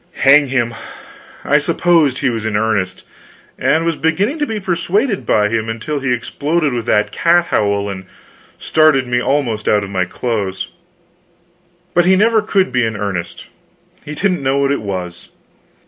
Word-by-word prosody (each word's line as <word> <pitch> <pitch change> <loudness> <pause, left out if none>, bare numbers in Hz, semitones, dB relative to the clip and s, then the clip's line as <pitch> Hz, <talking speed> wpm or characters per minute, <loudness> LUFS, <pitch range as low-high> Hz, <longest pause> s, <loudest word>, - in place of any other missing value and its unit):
Hang 140 +1 +6
him, 120 -3 -1 0.7
I - - +3
supposed 165 -7 +2
he 135 -2 0
was 115 -2 -4
in 110 -2 -1
earnest, 105 -4 -1 0.6
and 160 +1 +1
was 165 -1 0
beginning 195 - 0
to 295 - 0
be 220 -1 -3
persuaded 195 +4 -1
by 105 0 +3
him, 110 0 -2
until 115 +7 -3
he 135 -2 -2
exploded 145 +5 -1
that 105 -1 +2
cat 170 0 +2
howl 100 -1 +1
and 95 -1 -6 0.5
startled 155 -4 +3
me 120 0 0
almost 120 -6 -1
out 105 -1 +3
of 100 - -7
my 95 -2 0
clothes. 100 -2 -3 1.2
But 175 0 +3
he 190 +1 +5
never 220 +3 +3
could 195 -2 0
be 125 -1 +1
in 110 -1 -2
earnest. 100 -4 -4 0.6
He 150 - -7
didn't 180 -2 0
know 135 0 0
what 140 0 +1
it 140 - -1
was. 90 -4 -6
135 Hz, 165 wpm, -17 LUFS, 105-170 Hz, 1.2 s, Hang